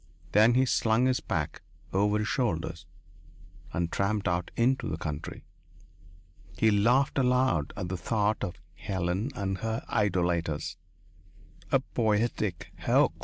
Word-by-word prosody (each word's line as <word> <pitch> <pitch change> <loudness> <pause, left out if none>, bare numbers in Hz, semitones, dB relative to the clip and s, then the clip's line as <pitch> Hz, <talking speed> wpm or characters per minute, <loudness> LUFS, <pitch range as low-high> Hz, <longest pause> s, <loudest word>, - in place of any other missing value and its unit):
Then 110 +3 +5
he 130 +1 +4
slung 115 0 +2
his 130 -1 +2
pack - - -3 0.3
over 105 +2 +2
his 105 0 -1
shoulders 85 - -1 0.8
and 85 -1 -1
tramped 100 0 0
out 90 0 0
into 130 +3 +2
the - - -3
country. 75 -1 -5 1.1
He 110 - +4
laughed 120 +8 +3
aloud 125 - +2
at 90 -4 -3
the 95 - -2
thought 105 +2 0
of 90 -3 -3 0.2
Helen 95 +4 -2
and 95 -1 -2
her 110 0 -3
idolaters. 85 -6 0 1.0
A - - +4
poetic 105 -4 -1
hoax. - - +3
105 Hz, 125 wpm, -29 LUFS, 90-115 Hz, 1.1 s, Then